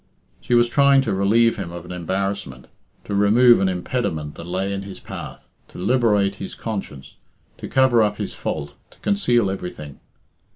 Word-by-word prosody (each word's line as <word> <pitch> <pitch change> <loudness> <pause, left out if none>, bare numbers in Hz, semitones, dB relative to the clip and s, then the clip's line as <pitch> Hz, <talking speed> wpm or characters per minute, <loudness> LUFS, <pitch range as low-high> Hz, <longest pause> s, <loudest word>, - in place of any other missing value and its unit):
She 120 - 0
was 120 0 +5
trying 140 +2 +4
to 110 -6 -2
relieve 110 +4 +3
him 95 -4 -5
of 85 0 -8
an 90 - -9
embarrassment; 90 -6 -3 0.4
to 105 - -5
remove 110 +4 +5
an 95 - +2
impediment 90 -5 -3
that 85 - -10
lay 95 +2 -2
in 100 - -3
his 100 -1 -9
path; - - -9 0.2
to - - -14
liberate 105 -2 +2
his 95 - -7
conscience; 95 -11 -6 0.4
to - - -6
cover 130 -3 +4
up 105 -1 +1
his - - -4
fault; 70 -2 -4 0.2
to - - -19
conceal 120 - +2
everything. 90 -7 -7
100 Hz, 170 wpm, -22 LUFS, 90-120 Hz, 0.4 s, was